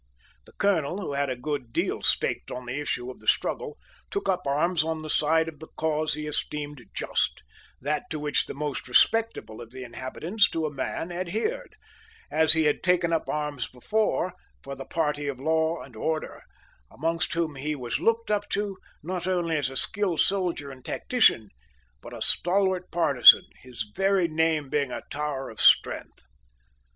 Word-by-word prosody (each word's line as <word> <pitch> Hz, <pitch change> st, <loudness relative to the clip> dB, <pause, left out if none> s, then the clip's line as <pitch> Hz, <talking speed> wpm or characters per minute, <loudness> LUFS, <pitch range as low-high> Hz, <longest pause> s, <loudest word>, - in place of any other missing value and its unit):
The -, -, -18 dB
colonel, 185 Hz, -3 st, +1 dB
who 180 Hz, -8 st, -4 dB
had 140 Hz, 0 st, 0 dB
a 130 Hz, -, -1 dB
good 125 Hz, -1 st, -4 dB
deal -, -, -1 dB
staked -, -, +1 dB
on 125 Hz, 0 st, -6 dB
the 125 Hz, +4 st, -3 dB
issue 125 Hz, -3 st, -2 dB
of -, -, -14 dB
the -, -, -17 dB
struggle, -, -, 0 dB, 0.3 s
took 400 Hz, -, -3 dB
up 180 Hz, -4 st, 0 dB
arms 160 Hz, +4 st, +2 dB
on 160 Hz, 0 st, -3 dB
the 155 Hz, -, -3 dB
side 160 Hz, +2 st, +3 dB
of 160 Hz, -2 st, -8 dB
the 160 Hz, -, -10 dB
cause 155 Hz, 0 st, 0 dB
he 150 Hz, -, -5 dB
esteemed 145 Hz, -2 st, -4 dB
just -, -, -1 dB, 0.4 s
that 150 Hz, -, -2 dB
to 155 Hz, -, -3 dB
which 145 Hz, -1 st, 0 dB
the -, -, -6 dB
most 145 Hz, -2 st, -3 dB
respectable 220 Hz, -, +2 dB
of 115 Hz, -, -10 dB
the 130 Hz, +1 st, -8 dB
inhabitants 155 Hz, -, 0 dB
to 160 Hz, -1 st, -2 dB
a 150 Hz, -, -3 dB
man 145 Hz, +5 st, -3 dB
adhered 220 Hz, -, -3 dB, 0.6 s
as 160 Hz, 0 st, +5 dB
he 160 Hz, 0 st, +2 dB
had 150 Hz, -1 st, +2 dB
taken 180 Hz, -2 st, +2 dB
up 165 Hz, -, -1 dB
arms 150 Hz, -4 st, -2 dB
before 185 Hz, -, -1 dB, 0.3 s
for 140 Hz, -, -6 dB
the 135 Hz, 0 st, -8 dB
party 150 Hz, -3 st, -1 dB
of 135 Hz, -3 st, -3 dB
law 160 Hz, +3 st, +1 dB
and 125 Hz, -3 st, -14 dB
order, 155 Hz, +7 st, -3 dB, 0.5 s
amongst 165 Hz, +3 st, -1 dB
whom 165 Hz, -2 st, 0 dB
he 150 Hz, +3 st, -3 dB
was 125 Hz, -4 st, -3 dB
looked 230 Hz, -1 st, +1 dB
up 205 Hz, 0 st, 0 dB
to, 200 Hz, -1 st, -2 dB, 0.2 s
not 180 Hz, +2 st, -3 dB
only 175 Hz, -3 st, 0 dB
as 145 Hz, -4 st, 0 dB
a 135 Hz, -, -6 dB
skilled 195 Hz, -1 st, +1 dB
soldier 175 Hz, -8 st, 0 dB
and 130 Hz, -1 st, -13 dB
tactician, 220 Hz, -, +2 dB, 0.5 s
but -, -, -10 dB
a -, -, -4 dB
stalwart 185 Hz, 0 st, +2 dB
partisan, 155 Hz, -7 st, +7 dB, 0.2 s
his 120 Hz, -4 st, -6 dB
very 195 Hz, -2 st, +3 dB
name 160 Hz, -2 st, +1 dB
being 140 Hz, -1 st, 0 dB
a -, -, -5 dB
tower 145 Hz, -3 st, -3 dB
of 110 Hz, -, -7 dB
strength. -, -, +3 dB
155 Hz, 180 wpm, -26 LUFS, 140-180 Hz, 0.6 s, partisan